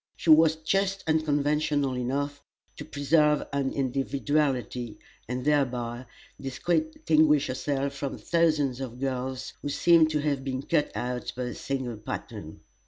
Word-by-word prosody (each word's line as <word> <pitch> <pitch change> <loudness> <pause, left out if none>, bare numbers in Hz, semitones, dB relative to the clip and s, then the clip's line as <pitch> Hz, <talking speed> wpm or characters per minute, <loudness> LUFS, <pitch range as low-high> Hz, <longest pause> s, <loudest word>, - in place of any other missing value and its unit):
She 165 - +2
was 160 0 +7
just 195 +5 0
unconventional 150 -3 +1
enough 140 +3 -2 0.3
to - - -6
preserve 150 +1 +2
an 140 -1 0
individuality, 135 -3 -1 0.3
and 125 +2 -4
thereby 125 -4 0 0.3
distinguish 155 +1 +2
herself 135 +2 -2
from 140 0 -4
thousands 155 -6 +1
of 125 -2 -6
girls 130 -1 -3
who 145 - -3
seem 165 +2 +5
to 155 -1 -1
have 145 -3 -1
been 130 0 -3
cut 150 0 +1
out 125 0 -3
by 125 - -2
a 125 - -4
single 130 -4 -4
pattern. 105 - -7
140 Hz, 130 wpm, -27 LUFS, 130-155 Hz, 0.3 s, was